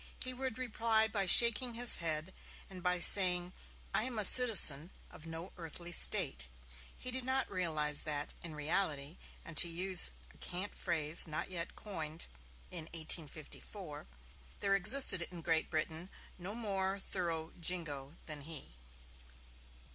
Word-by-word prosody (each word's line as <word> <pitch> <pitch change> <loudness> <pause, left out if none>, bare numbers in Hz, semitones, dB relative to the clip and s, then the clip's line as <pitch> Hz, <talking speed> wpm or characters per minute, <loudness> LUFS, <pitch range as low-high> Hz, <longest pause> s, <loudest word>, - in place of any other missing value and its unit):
he 255 - -3
would 260 -2 -5
reply 225 -3 -1
by 205 -3 -2
shaking 235 +4 +7
his 240 0 +6
head, 160 +1 -4 0.4
and 185 -1 -11
by 180 0 -1
saying: 180 -1 +5 0.4
'I - - 0
am 255 -3 -5
a 210 - +2
citizen 185 - +6 0.2
of 160 - -13
no 165 +3 -9
earthly 170 +1 -7
State'. 65 - +3 0.5
He 255 - -1
did 260 0 -5
not 260 +1 -1
realize 155 -6 +1
that, 150 -1 -4
in 165 -3 -10
reality, 150 -1 -2 0.3
and 170 - -12
to 175 - +7
use 180 - +2 0.2
a - - -23
cant 185 +3 -5
phrase 165 -2 -1
not 155 +4 -5
yet 170 -2 -5
coined 160 -6 -6 0.5
in 160 - -5
1854, 160 +1 -5 0.5
there 195 - -1
existed 195 0 +5
in 175 -2 -12
Great 165 -1 -2
Britain 160 +3 -6 0.3
no 190 +4 -6
more 195 -4 -4
thorough 170 -4 -5
'Jingo' 160 -5 -2
than 155 -2 -7
he. 150 - -8
175 Hz, 140 wpm, -32 LUFS, 160-200 Hz, 0.5 s, shaking